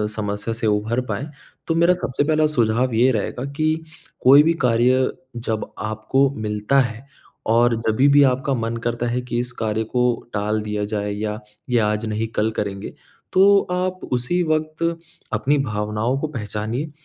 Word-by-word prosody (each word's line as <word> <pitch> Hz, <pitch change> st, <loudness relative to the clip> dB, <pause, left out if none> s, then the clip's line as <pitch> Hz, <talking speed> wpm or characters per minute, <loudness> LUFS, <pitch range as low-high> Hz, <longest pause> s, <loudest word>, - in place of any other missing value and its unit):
समस्या 105 Hz, +1 st, -3 dB
से 115 Hz, 0 st, -2 dB
उभर 110 Hz, +4 st, +1 dB
पाएँ, 140 Hz, +4 st, -4 dB, 0.4 s
तो 165 Hz, -, +1 dB
मेरा 170 Hz, +2 st, +4 dB
सबसे 145 Hz, -6 st, -1 dB
पहला 155 Hz, +1 st, +2 dB
सुझाव 125 Hz, -3 st, +1 dB
ये 120 Hz, +4 st, +4 dB
रहेगा 120 Hz, +3 st, -2 dB
कि, 155 Hz, +2 st, 0 dB, 0.4 s
कोई 140 Hz, +3 st, +7 dB
भी 165 Hz, +2 st, +3 dB
कार्य 125 Hz, +2 st, +3 dB, 0.2 s
जब 110 Hz, -2 st, -3 dB
आपको 110 Hz, +6 st, +1 dB
मिलता 105 Hz, +5 st, +1 dB
है, 120 Hz, 0 st, -2 dB, 0.4 s
और 120 Hz, +1 st, +3 dB
जभी 120 Hz, +6 st, +3 dB
भी 145 Hz, 0 st, +6 dB
आपका 135 Hz, +1 st, +1 dB
मन 115 Hz, -2 st, -2 dB
करता 120 Hz, +1 st, -2 dB
है 120 Hz, +1 st, -1 dB
कि 125 Hz, -1 st, -4 dB
इस 125 Hz, 0 st, -2 dB
कार्य 110 Hz, 0 st, 0 dB
को 125 Hz, +3 st, -1 dB, 0.3 s
टाल 105 Hz, +1 st, 0 dB
दिया 105 Hz, -1 st, -3 dB
जाए 105 Hz, -1 st, -3 dB
या 105 Hz, +1 st, -3 dB, 0.3 s
ये 125 Hz, -, +2 dB
आज 105 Hz, 0 st, 0 dB
नहीं 110 Hz, +1 st, -2 dB
कल 110 Hz, +1 st, +1 dB
करेंगे, 100 Hz, -1 st, -4 dB, 0.4 s
तो 200 Hz, +2 st, +6 dB
आप 185 Hz, +1 st, -1 dB
उसी 125 Hz, +9 st, +1 dB
वक्त 155 Hz, +1 st, -1 dB, 0.5 s
अपनी 145 Hz, +2 st, +2 dB
भावनाओं 105 Hz, 0 st, -1 dB
को 155 Hz, -, -2 dB
पहचानिए 115 Hz, +2 st, -4 dB
120 Hz, 165 wpm, -21 LUFS, 110-140 Hz, 0.5 s, कोई